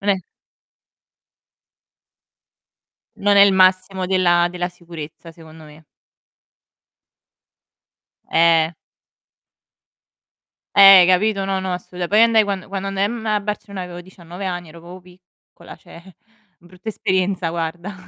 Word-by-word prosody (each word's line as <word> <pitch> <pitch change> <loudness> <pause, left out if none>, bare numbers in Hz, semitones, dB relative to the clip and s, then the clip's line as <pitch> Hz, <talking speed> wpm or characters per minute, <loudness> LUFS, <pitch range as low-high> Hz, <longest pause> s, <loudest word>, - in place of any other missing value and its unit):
Non 200 - 0
è 195 - +1 3.0
non 205 0 +1
è 200 - +8
il 200 -1 +5
massimo 185 0 +2
della 175 -2 +2
della 175 0 -4
sicurezza, 170 -2 -11
secondo 160 -1 -16
me. 150 +1 -17 2.5
Eh. 165 0 +2 2.0
Eh, - - +5
hai 195 -2 +9
capito? 195 +2 +1
No, 195 0 -2
no, 190 -1 -4
assoluta 180 0 -6
poi 210 +2 +3
andai 230 -1 +4
quando 200 -2 -4
quando 195 0 -5
andai 195 0 -1
a - - 0
mhmm, 230 0 -7
a 210 -1 0
Barcellona 200 -2 -6
avevo 175 -1 -9
19 175 +1 -11
anni, 175 -3 -5
ero 165 +2 -14
proprio 175 +2 -12
piccola, 180 0 -18
cioè, 175 +2 -17 0.4
brutta 180 +4 -13
esperienza 185 -3 -2
guarda. 170 +4 -5
185 Hz, 125 wpm, -19 LUFS, 175-195 Hz, 3.0 s, hai